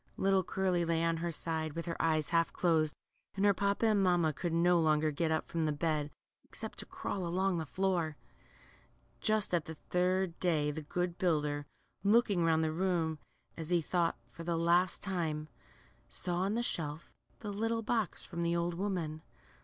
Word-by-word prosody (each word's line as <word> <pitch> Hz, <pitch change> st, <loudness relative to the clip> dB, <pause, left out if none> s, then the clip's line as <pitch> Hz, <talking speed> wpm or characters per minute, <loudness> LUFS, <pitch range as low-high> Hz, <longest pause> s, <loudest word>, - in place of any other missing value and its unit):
Little 195 Hz, -1 st, +3 dB
Curly 185 Hz, -1 st, 0 dB
lay 165 Hz, 0 st, +1 dB
on 165 Hz, 0 st, +1 dB
her 170 Hz, +1 st, -2 dB
side, 160 Hz, -1 st, -2 dB
with 165 Hz, +1 st, -4 dB
her 170 Hz, -1 st, -3 dB
eyes 155 Hz, -2 st, +1 dB
half 165 Hz, -1 st, +2 dB
closed, 160 Hz, -3 st, +2 dB, 0.4 s
and 195 Hz, +1 st, +1 dB
her 200 Hz, -, +6 dB
papa 200 Hz, +3 st, +1 dB
and 215 Hz, -2 st, +4 dB
mamma 175 Hz, -4 st, +3 dB
could 170 Hz, +3 st, -3 dB
no 170 Hz, +1 st, +4 dB
longer 155 Hz, -1 st, +3 dB
get 160 Hz, +3 st, 0 dB
up 160 Hz, -, 0 dB
from 165 Hz, -1 st, -1 dB
the 155 Hz, -, +1 dB
bed, 150 Hz, -1 st, 0 dB, 0.3 s
except -, -, -7 dB
to -, -, -7 dB
crawl 190 Hz, -, -4 dB
along 185 Hz, +1 st, +1 dB
the 160 Hz, -, -4 dB
floor. 175 Hz, -4 st, 0 dB, 1.0 s
Just 215 Hz, -3 st, +1 dB
at 170 Hz, -3 st, +2 dB
the 160 Hz, -, -7 dB
third 180 Hz, +2 st, 0 dB
day 155 Hz, -5 st, +2 dB
the 155 Hz, +2 st, -5 dB
good 175 Hz, +3 st, -2 dB
builder, 150 Hz, -4 st, 0 dB, 0.4 s
looking 205 Hz, -3 st, +4 dB
round 160 Hz, -1 st, +3 dB
the 155 Hz, -, +1 dB
room, 165 Hz, -2 st, 0 dB, 0.4 s
as 160 Hz, -1 st, -5 dB
he 175 Hz, -1 st, +4 dB
thought, 170 Hz, -2 st, 0 dB
for 165 Hz, -, -9 dB
the 170 Hz, 0 st, -1 dB
last 170 Hz, +2 st, +2 dB
time, 160 Hz, -5 st, -2 dB, 0.6 s
saw 175 Hz, -2 st, -2 dB
on 195 Hz, +4 st, 0 dB
the 240 Hz, -, 0 dB
shelf 155 Hz, -7 st, -3 dB, 0.3 s
the 210 Hz, -, -4 dB
little 225 Hz, +2 st, -1 dB
box 220 Hz, -3 st, -1 dB
from 170 Hz, -, -5 dB
the 170 Hz, 0 st, +1 dB
old 170 Hz, 0 st, 0 dB
woman. 170 Hz, -4 st, -2 dB
170 Hz, 185 wpm, -33 LUFS, 160-185 Hz, 1.0 s, her